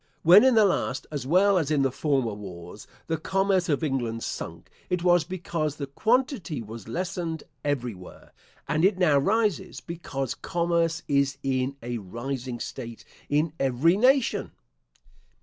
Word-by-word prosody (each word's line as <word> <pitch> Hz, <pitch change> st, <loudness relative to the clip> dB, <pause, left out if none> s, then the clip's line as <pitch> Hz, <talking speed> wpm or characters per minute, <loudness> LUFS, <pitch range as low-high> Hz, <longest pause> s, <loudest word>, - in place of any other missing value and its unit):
When 180 Hz, +7 st, +8 dB
in 260 Hz, -2 st, +5 dB
the 220 Hz, -2 st, +6 dB
last, 135 Hz, -8 st, 0 dB
as 140 Hz, -4 st, -4 dB
well 190 Hz, +4 st, +4 dB
as 155 Hz, -4 st, -2 dB
in 140 Hz, -3 st, +3 dB
former 135 Hz, -5 st, 0 dB
wars, 95 Hz, -1 st, -9 dB, 0.2 s
the 160 Hz, -, -1 dB
commerce 195 Hz, +1 st, +1 dB
of 145 Hz, +1 st, +1 dB
England 120 Hz, -6 st, -2 dB
sunk, -, -, -6 dB, 0.2 s
it 180 Hz, -1 st, -1 dB
was 175 Hz, -2 st, +4 dB
because 165 Hz, -4 st, -3 dB
the 145 Hz, -, -4 dB
quantity 220 Hz, -, 0 dB
was 110 Hz, -1 st, -9 dB
lessened 170 Hz, +2 st, -3 dB, 0.2 s
everywhere; 120 Hz, -10 st, -4 dB, 0.3 s
and 155 Hz, +2 st, 0 dB
it 195 Hz, 0 st, +4 dB
now 155 Hz, -6 st, +4 dB
rises, 200 Hz, +1 st, 0 dB
because 140 Hz, -6 st, -4 dB
commerce 170 Hz, -1 st, 0 dB
is 140 Hz, -1 st, +1 dB
in 130 Hz, 0 st, 0 dB
a 120 Hz, 0 st, -3 dB
rising 120 Hz, +5 st, -5 dB
state 115 Hz, -2 st, -7 dB, 0.2 s
in 150 Hz, +2 st, +1 dB
every 135 Hz, +6 st, +3 dB
nation. 255 Hz, +4 st, +2 dB
150 Hz, 145 wpm, -26 LUFS, 130-180 Hz, 0.3 s, When